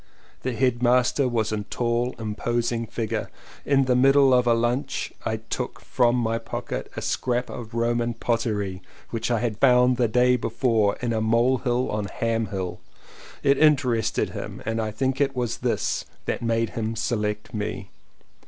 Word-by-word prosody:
The 130 Hz, -, -2 dB
headmaster 125 Hz, +2 st, +2 dB
was 115 Hz, -3 st, 0 dB
a 105 Hz, -1 st, -1 dB
tall 120 Hz, +3 st, -1 dB
imposing 115 Hz, +1 st, -2 dB
figure. 110 Hz, -1 st, -3 dB, 0.4 s
In 135 Hz, -1 st, +3 dB
the 125 Hz, -1 st, +2 dB
middle 135 Hz, +1 st, +5 dB
of 125 Hz, -1 st, +3 dB
lunch 120 Hz, +4 st, 0 dB
I 110 Hz, -, 0 dB
took 120 Hz, +3 st, -5 dB
from 120 Hz, -1 st, +2 dB
my 115 Hz, -2 st, 0 dB
pocket -, -, -5 dB
a -, -, -3 dB
scrap 125 Hz, 0 st, -1 dB
of 115 Hz, -1 st, -8 dB
Roman 120 Hz, 0 st, 0 dB
pottery 105 Hz, -5 st, -1 dB, 0.3 s
which 115 Hz, 0 st, -2 dB
I 115 Hz, -3 st, +1 dB
had 115 Hz, -3 st, -2 dB
found 125 Hz, -1 st, +5 dB
the 120 Hz, -1 st, +3 dB
day 125 Hz, +2 st, +3 dB
before 115 Hz, -3 st, +1 dB
in 120 Hz, -1 st, 0 dB
a 110 Hz, -, 0 dB
mole 120 Hz, +4 st, +3 dB
hill 125 Hz, 0 st, 0 dB
on 105 Hz, -1 st, -1 dB
Ham 115 Hz, +2 st, -1 dB
Hill. 95 Hz, -2 st, -4 dB, 0.6 s
It 140 Hz, -1 st, +4 dB
interested 130 Hz, -7 st, +2 dB
him -, -, -7 dB
and 115 Hz, 0 st, -1 dB
I 110 Hz, -, -2 dB
think 130 Hz, +5 st, -1 dB
it 135 Hz, -1 st, +1 dB
was 125 Hz, -2 st, -2 dB
this -, -, -1 dB, 0.2 s
that -, -, -2 dB
made 115 Hz, -1 st, 0 dB
him 115 Hz, 0 st, -3 dB
select 105 Hz, -1 st, -2 dB
me. 105 Hz, -1 st, -4 dB
120 Hz, 160 wpm, -25 LUFS, 110-125 Hz, 0.6 s, middle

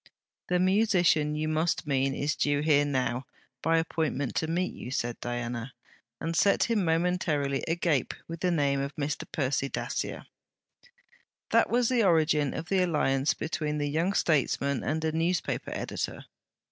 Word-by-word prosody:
'The 180 Hz, -, +2 dB
musician 180 Hz, -6 st, +3 dB
you 155 Hz, +1 st, -1 dB
must 155 Hz, +1 st, 0 dB
mean 135 Hz, -1 st, +1 dB
is 150 Hz, +1 st, -1 dB
due 145 Hz, 0 st, +1 dB
here 150 Hz, -2 st, +4 dB
now, 130 Hz, -2 st, -1 dB, 0.4 s
by 165 Hz, +1 st, +2 dB
appointment 160 Hz, -4 st, -1 dB
to 160 Hz, -, -1 dB
meet 175 Hz, +3 st, -1 dB
you,' -, -, -8 dB
said 120 Hz, -2 st, -2 dB
Diana, 120 Hz, +1 st, -4 dB, 0.5 s
and 165 Hz, 0 st, -3 dB
set 200 Hz, +4 st, +4 dB
him 225 Hz, -4 st, +1 dB
momentarily 160 Hz, -5 st, 0 dB
agape 165 Hz, -5 st, 0 dB
with 165 Hz, 0 st, -6 dB
the 180 Hz, -, +1 dB
name 140 Hz, -5 st, +1 dB
of 140 Hz, 0 st, -4 dB
Mr. 145 Hz, -1 st, -3 dB
Percy 140 Hz, -1 st, 0 dB
Dacier. -, -, -3 dB, 1.3 s
That -, -, +4 dB
was 240 Hz, 0 st, +2 dB
the 245 Hz, -2 st, +2 dB
origin 155 Hz, -5 st, +3 dB
of 160 Hz, -, -5 dB
the 195 Hz, -1 st, +3 dB
alliance 150 Hz, -5 st, +1 dB
between 155 Hz, -1 st, -2 dB
the 145 Hz, -1 st, -1 dB
young 170 Hz, +6 st, +1 dB
statesman 140 Hz, -5 st, +1 dB
and 155 Hz, +4 st, -1 dB
a 160 Hz, -, +1 dB
newspaper 165 Hz, +3 st, -1 dB
editor. -, -, -4 dB
155 Hz, 155 wpm, -28 LUFS, 140-170 Hz, 1.3 s, here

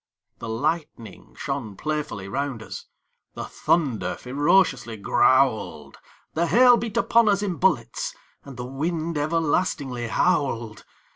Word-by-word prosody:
The 115 Hz, -, -6 dB
lightning 145 Hz, -1 st, -4 dB
shone 135 Hz, -8 st, -4 dB
playfully 150 Hz, -10 st, -3 dB
round 130 Hz, +1 st, -3 dB
us; -, -, -9 dB, 0.5 s
The -, -, -5 dB
thunder 140 Hz, -10 st, 0 dB
ferociously 135 Hz, -3 st, +1 dB
growled; 130 Hz, +3 st, +1 dB, 0.3 s
The 170 Hz, +2 st, +1 dB
hail 245 Hz, +5 st, +6 dB
beat 230 Hz, -3 st, -3 dB
upon 230 Hz, -2 st, +4 dB
us 200 Hz, 0 st, +2 dB
in 185 Hz, -5 st, -2 dB
bullets; 120 Hz, -12 st, 0 dB, 0.3 s
And 140 Hz, -3 st, -11 dB
the 125 Hz, -, -5 dB
wind 160 Hz, +5 st, -3 dB
everlastingly 145 Hz, -5 st, -1 dB
howled. 120 Hz, -7 st, 0 dB
145 Hz, 120 wpm, -24 LUFS, 120-170 Hz, 0.5 s, hail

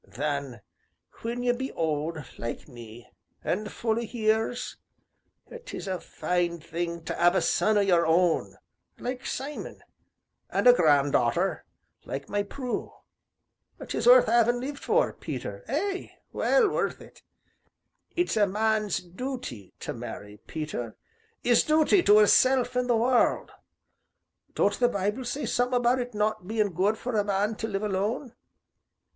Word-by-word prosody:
Then, 140 Hz, -6 st, -3 dB, 0.6 s
when 240 Hz, +2 st, -3 dB
ye 245 Hz, -, +3 dB
be 260 Hz, +2 st, -3 dB
old, 160 Hz, 0 st, -1 dB, 0.2 s
like 115 Hz, -, -5 dB
me, 120 Hz, -3 st, -12 dB, 0.4 s
an' 215 Hz, -, -1 dB
full 225 Hz, +1 st, -1 dB
o' -, -, -2 dB
years 225 Hz, +1 st, -1 dB, 0.9 s
'tis -, -, -7 dB
a 185 Hz, -1 st, -2 dB
fine 175 Hz, -1 st, -2 dB
thing 170 Hz, +1 st, -4 dB
to 170 Hz, -, -3 dB
'ave 175 Hz, +2 st, +5 dB
a -, -, +2 dB
son 215 Hz, 0 st, +2 dB
o' -, -, +4 dB
your 175 Hz, -4 st, +3 dB
own 170 Hz, +1 st, +2 dB, 0.4 s
like 255 Hz, +2 st, -5 dB
Simon 280 Hz, +3 st, -6 dB, 0.7 s
an' -, -, -1 dB
a 245 Hz, -, +10 dB
granddarter 140 Hz, -, +2 dB, 0.4 s
like 140 Hz, +1 st, -6 dB
my 205 Hz, 0 st, 0 dB
Prue 245 Hz, +5 st, -4 dB, 1.0 s
'tis -, -, -2 dB
worth 250 Hz, 0 st, +8 dB
'aving 240 Hz, +1 st, +3 dB
lived 280 Hz, +3 st, -5 dB
for, -, -, +2 dB
Peter, -, -, -6 dB
ay, 395 Hz, -1 st, -2 dB, 0.2 s
well -, -, +3 dB
worth -, -, -1 dB
it. -, -, -15 dB, 0.9 s
It's 350 Hz, +1 st, 0 dB
a 210 Hz, -2 st, +4 dB
man's 215 Hz, 0 st, 0 dB
dooty 180 Hz, -, -7 dB
to -, -, -4 dB
marry, 105 Hz, 0 st, -8 dB
Peter, 150 Hz, -8 st, -5 dB, 0.5 s
'is 240 Hz, -1 st, +4 dB
dooty 315 Hz, +5 st, +4 dB
to 210 Hz, -, +8 dB
'isself 250 Hz, +3 st, +4 dB
an' 250 Hz, 0 st, +1 dB
the 240 Hz, -2 st, +3 dB
world. 245 Hz, +2 st, +2 dB, 1.0 s
Don't 205 Hz, -, +1 dB
the 245 Hz, -1 st, +4 dB
Bible 210 Hz, +4 st, -2 dB
say 275 Hz, +3 st, -3 dB
summat 245 Hz, +2 st, 0 dB
about 245 Hz, +1 st, +3 dB
it 245 Hz, -2 st, -5 dB
not 210 Hz, -3 st, -1 dB
bein' 215 Hz, -2 st, 0 dB
good 200 Hz, +6 st, +1 dB
for 245 Hz, 0 st, -4 dB
a 210 Hz, -, +3 dB
man 205 Hz, +2 st, 0 dB
to 220 Hz, -, -3 dB
live 200 Hz, -1 st, -3 dB
alone? 210 Hz, +6 st, -2 dB
215 Hz, 145 wpm, -27 LUFS, 170-245 Hz, 1.0 s, a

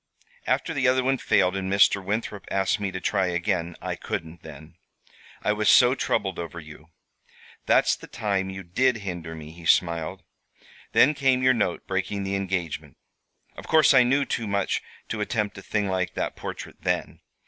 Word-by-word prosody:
After 165 Hz, -, 0 dB
the 135 Hz, -4 st, +1 dB
other 130 Hz, 0 st, +3 dB
one 135 Hz, 0 st, +1 dB
failed, 90 Hz, +1 st, +2 dB
and 95 Hz, -1 st, -3 dB
Mr. 100 Hz, 0 st, +4 dB
Winthrop 105 Hz, 0 st, -3 dB
asked 95 Hz, +2 st, +1 dB
me 100 Hz, -1 st, -2 dB
to 95 Hz, -, -4 dB
try 95 Hz, 0 st, 0 dB
again, 85 Hz, -1 st, -1 dB
I -, -, -2 dB
couldn't 80 Hz, 0 st, -6 dB
then. 80 Hz, +1 st, -12 dB, 0.7 s
I 105 Hz, -, +2 dB
was 105 Hz, 0 st, +1 dB
so 125 Hz, 0 st, +7 dB
troubled 95 Hz, -7 st, -1 dB
over 85 Hz, 0 st, -6 dB
you. 75 Hz, 0 st, -13 dB, 0.8 s
That's -, -, +4 dB
the -, -, -13 dB
time 100 Hz, -2 st, -2 dB
you 95 Hz, 0 st, -7 dB
did 125 Hz, +8 st, +1 dB
hinder 85 Hz, -3 st, -5 dB
me," 80 Hz, -1 st, -9 dB
he 85 Hz, 0 st, -9 dB
smiled. 85 Hz, +2 st, +1 dB, 0.7 s
"Then 150 Hz, -, +6 dB
came 135 Hz, -3 st, +2 dB
your 130 Hz, 0 st, +5 dB
note 105 Hz, -7 st, -1 dB
breaking 95 Hz, +1 st, -2 dB
the 95 Hz, 0 st, -2 dB
engagement. 85 Hz, -7 st, -3 dB, 0.6 s
Of -, -, -10 dB
course 155 Hz, -2 st, +5 dB
I 130 Hz, -, +7 dB
knew 135 Hz, +3 st, +2 dB
too 115 Hz, -3 st, -3 dB
much 100 Hz, -1 st, 0 dB, 0.3 s
to 105 Hz, -, -3 dB
attempt 105 Hz, -2 st, -2 dB
a -, -, -10 dB
thing 105 Hz, +1 st, -1 dB
like 95 Hz, -1 st, -2 dB
that -, -, -2 dB
portrait -, -, -8 dB
then. -, -, -2 dB
95 Hz, 180 wpm, -25 LUFS, 85-110 Hz, 0.8 s, so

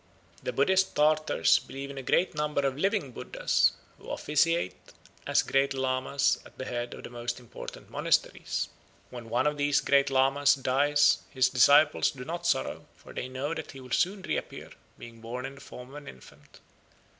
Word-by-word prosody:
The -, -, -3 dB
Buddhist 190 Hz, -, +2 dB
Tartars 155 Hz, +1 st, +3 dB
believe 140 Hz, +1 st, -8 dB
in 140 Hz, -, -10 dB
a -, -, -5 dB
great 170 Hz, +7 st, +1 dB
number 150 Hz, -1 st, -1 dB
of 135 Hz, -1 st, 0 dB
living 190 Hz, -, 0 dB
Buddhas, -, -, +1 dB, 0.3 s
who -, -, -12 dB
officiate 160 Hz, -, 0 dB, 0.3 s
as -, -, +3 dB
Grand 135 Hz, 0 st, +1 dB
Lamas 130 Hz, +1 st, +1 dB
at -, -, -17 dB
the 130 Hz, -, -5 dB
head 120 Hz, -1 st, -4 dB
of -, -, -11 dB
the -, -, -9 dB
most 120 Hz, 0 st, -4 dB
important 120 Hz, -2 st, -10 dB
monasteries. -, -, 0 dB, 0.4 s
When 120 Hz, -2 st, -9 dB
one 120 Hz, +5 st, +1 dB
of 150 Hz, 0 st, +1 dB
these 145 Hz, 0 st, +2 dB
Grand 140 Hz, 0 st, +3 dB
Lamas 135 Hz, +1 st, +3 dB
dies 145 Hz, +2 st, +3 dB
his 130 Hz, -2 st, +2 dB
disciples 145 Hz, +4 st, +5 dB
do 125 Hz, -2 st, -8 dB
not 170 Hz, +2 st, -4 dB
sorrow, 65 Hz, -, -1 dB
for -, -, -14 dB
they 130 Hz, -, -5 dB
know 135 Hz, +4 st, -3 dB
that 160 Hz, -3 st, -7 dB
he 135 Hz, -, -10 dB
will 130 Hz, -1 st, -12 dB
soon 190 Hz, +6 st, +1 dB
reappear, -, -, -4 dB, 0.3 s
being 115 Hz, -1 st, -12 dB
born 125 Hz, +3 st, -5 dB
in 135 Hz, -, -6 dB
the 140 Hz, -, -14 dB
form 125 Hz, -2 st, -11 dB
of 140 Hz, -, -13 dB
an 150 Hz, -, -11 dB
infant. 65 Hz, -, -15 dB
140 Hz, 180 wpm, -28 LUFS, 130-150 Hz, 0.4 s, disciples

